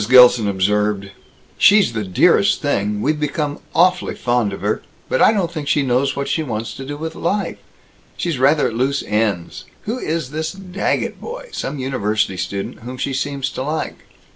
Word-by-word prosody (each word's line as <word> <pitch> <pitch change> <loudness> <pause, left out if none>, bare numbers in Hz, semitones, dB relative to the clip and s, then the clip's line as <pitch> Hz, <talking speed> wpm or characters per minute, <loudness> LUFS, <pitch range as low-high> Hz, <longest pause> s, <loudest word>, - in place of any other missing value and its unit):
Gilson 125 -3 +7
observed, 100 +1 0 0.5
"She's 200 - +6
the 110 -2 -2
dearest 95 -2 +3
thing. 105 +1 -1
We've 150 +2 +1
become 150 0 -2 0.2
awfully 180 +2 +3
fond 120 -4 +1
of 100 - -7
her. 105 +2 0 0.3
But - - 0
I - - +7
don't 190 -6 0
think 155 -4 -5
she 145 - +2
knows 135 +2 +1
what 140 0 -2
she 160 - 0
wants 115 -6 -4
to 135 - -8
do 145 +1 -5
with 160 +1 -5
life. 200 +4 -2 0.6
She's 170 -7 -2
rather 145 +3 +4
at - - -8
loose 135 +4 0
ends. 105 -5 -1 0.2
Who 230 +4 -3
is 155 - -2
this 160 +1 -3
Daggett 195 0 -2
boy - - -7
some 145 - -4
university 110 -7 -1
student 100 +2 -4
whom 125 +3 -8
she 135 +2 -2
seems 140 0 -2
to - - -5
like?" 155 +4 -3
135 Hz, 180 wpm, -20 LUFS, 110-155 Hz, 0.6 s, Gilson